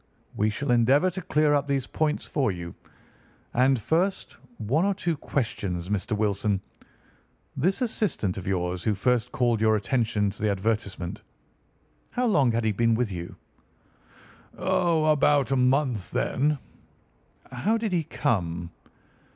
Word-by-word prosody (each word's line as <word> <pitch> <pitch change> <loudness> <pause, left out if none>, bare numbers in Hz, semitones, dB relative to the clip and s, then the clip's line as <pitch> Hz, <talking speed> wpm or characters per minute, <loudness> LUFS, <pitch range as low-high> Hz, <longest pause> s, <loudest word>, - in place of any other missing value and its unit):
"We 105 +1 +2
shall 125 +5 -2
endeavour 135 +9 +4
to 185 +2 -5
clear 150 -2 +2
up 145 0 +1
these 140 -2 0
points 155 -1 -1
for 135 -8 0
you. 85 -2 -7 0.8
And, 130 +1 +3
first, 175 - -1 0.2
one 125 - +1
or 200 0 +1
two 170 -2 -1
questions, 100 - -3
Mr. 105 +2 -1
Wilson. 105 -1 0 1.0
This 190 - +1
assistant 205 - -1
of 95 -2 -7
yours 90 -2 -1
who 105 - +1
first 125 +3 +1
called 120 -3 +1
your 110 0 +4
attention 105 -1 0
to 100 - -14
the 110 - +2
advertisement—how 100 - -5
long 145 - +3
had 115 0 0
he 110 - +2
been 115 +2 +2
with 115 -2 -1
you?" 85 -1 -6 1.2
"About 155 -4 +2
a - - +3
month 125 -5 +1
then." 145 - 0 0.9
"How 220 +3 0
did 220 -2 -2
he 175 -3 +1
come?" 85 - -2
120 Hz, 135 wpm, -26 LUFS, 100-150 Hz, 1.2 s, endeavour